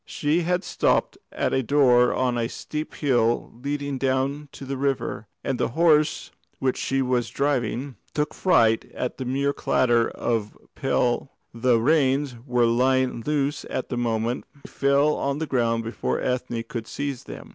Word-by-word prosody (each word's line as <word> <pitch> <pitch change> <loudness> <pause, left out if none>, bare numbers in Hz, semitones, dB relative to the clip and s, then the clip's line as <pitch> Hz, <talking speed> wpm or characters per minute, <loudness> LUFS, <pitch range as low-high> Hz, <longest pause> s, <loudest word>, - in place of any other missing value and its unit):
She 155 +4 0
had 180 +2 0
stopped - - +1
at - - -1
a 130 - +2
door 125 -2 +4
on 130 -1 +1
that 120 -1 -1
steep 155 +3 -6
hill 120 -5 +1
leading 140 -1 -3
down 135 +2 -1
to 135 - -9
the 135 +1 -3
river, 135 -5 -2 0.2
and 135 -2 -2
the - - +2
horse 155 -3 +3 0.3
which 130 -1 0
she 135 0 0
was 125 -2 0
driving 135 -1 -1 0.2
took 150 -1 0
fright 115 -12 +3
at 125 - -3
the 130 - -3
mere 140 +3 0
clatter 120 -4 +2
of 115 -3 -2
a - - -26
pail 130 -1 0 0.2
and 115 - -11
bolted. 130 - -1
The 120 -2 +5
reins 140 -1 +2
were 125 -1 +3
lying 125 +1 +2
loose 145 +2 -1
at 130 - -3
the 125 - -3
moment; 115 0 -1 0.2
they - - -11
fell 140 +2 +3
on 140 0 -1
the 160 - -2
ground 115 -5 0
before 115 +1 -2
Ethne 125 -2 -2
could 115 -1 -5
seize 140 -3 -4
them. - - -9
130 Hz, 175 wpm, -24 LUFS, 120-140 Hz, 0.3 s, The